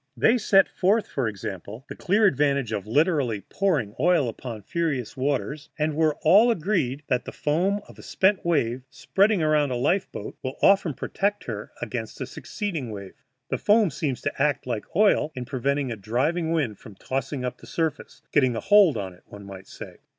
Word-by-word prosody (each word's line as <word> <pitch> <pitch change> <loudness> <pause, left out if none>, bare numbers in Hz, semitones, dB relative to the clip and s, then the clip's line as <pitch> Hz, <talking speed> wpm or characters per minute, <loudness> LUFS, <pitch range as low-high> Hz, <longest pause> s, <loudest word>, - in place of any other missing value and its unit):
They 240 +2 +4
set 195 -2 +4
forth, 205 +4 +1
for 130 -4 -2
example, 105 +3 -6
the - - -8
clear 205 +4 +2
advantage 140 - +2
of 100 0 -3
literally 135 - +1
pouring 150 - -1
oil 175 -7 +3
upon 115 -2 -7
furious 145 - -2
waters, 140 +2 -2
and 155 0 0
were 155 -1 +2
all 205 +9 +6
agreed 160 - 0
that 125 -2 0
the - - -6
foam 185 +7 0
of - - -15
a - - -9
spent 190 +1 +1
wave, 130 -7 0
spreading 195 +6 +1
around 150 -2 +2
a 125 - -2
life 170 +10 0
boat, 105 - -8
will 130 0 -4
often 195 -7 +4
protect 205 +8 -2
her 105 -3 -6
against 115 -2 -5
a 130 - -3
succeeding 160 - -5
wave. 100 -3 -8 0.4
The - - -2
foam 210 -4 +4
seems 140 -3 -3
to - - -3
act 145 -1 +1
like 120 -4 -3
oil 195 -6 +3
in 125 -1 -5
preventing 135 +1 -1
a - - -3
driving 145 - -1
wind 135 -11 -1
from 105 - -13
tossing 135 +2 -3
up 125 - -4
the - - -14
surface 160 -2 -3
getting 130 -5 +3
a - - -1
hold 205 -6 +5
on 95 -2 -5
it, 90 - -20
one 100 -1 -11
might 95 -1 -10
say. - - -10
145 Hz, 190 wpm, -25 LUFS, 120-175 Hz, 0.4 s, all